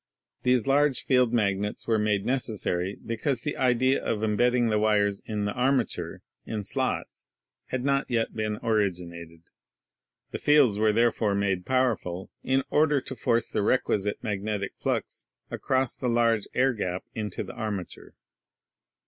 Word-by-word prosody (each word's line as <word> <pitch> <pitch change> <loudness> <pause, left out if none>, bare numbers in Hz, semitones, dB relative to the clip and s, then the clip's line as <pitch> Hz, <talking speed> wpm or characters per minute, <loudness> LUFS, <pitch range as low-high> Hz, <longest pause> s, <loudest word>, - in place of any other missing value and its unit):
These 125 -2 +2
large 140 0 +3
field 125 -3 +3
magnets 105 -3 0
were 110 -2 +2
made 105 -2 +1
necessary 105 -7 -1
because 115 +2 -1
the 145 - -3
idea 130 +1 +2
of 110 -1 -1
embedding 120 +3 +2
the 105 -1 +2
wires 105 -2 +2
in 105 -2 -2
the 105 - -1
armature 130 -1 -1 0.2
in 105 -2 -4
slots - - -3 0.4
had 130 0 -3
not 140 0 +1
yet 115 -2 0
been 110 -1 -2
originated. 85 -7 -2 0.9
The - - -4
fields 140 -9 +4
were 110 0 +4
therefore 110 -2 +2
made 95 -2 -1
powerful 115 -9 0
in 130 +1 +1
order 150 -1 +3
to 130 - -8
force 115 0 +1
the - - 0
requisite 105 -2 +1
magnetic 105 -1 -2
flux - - -3 0.2
across 130 -2 0
the 125 - -3
large 115 -2 +2
air 130 0 +3
gap 90 -5 -3
into 105 -2 -4
the - - -9
armature. 105 -6 -6
110 Hz, 145 wpm, -27 LUFS, 105-125 Hz, 0.9 s, fields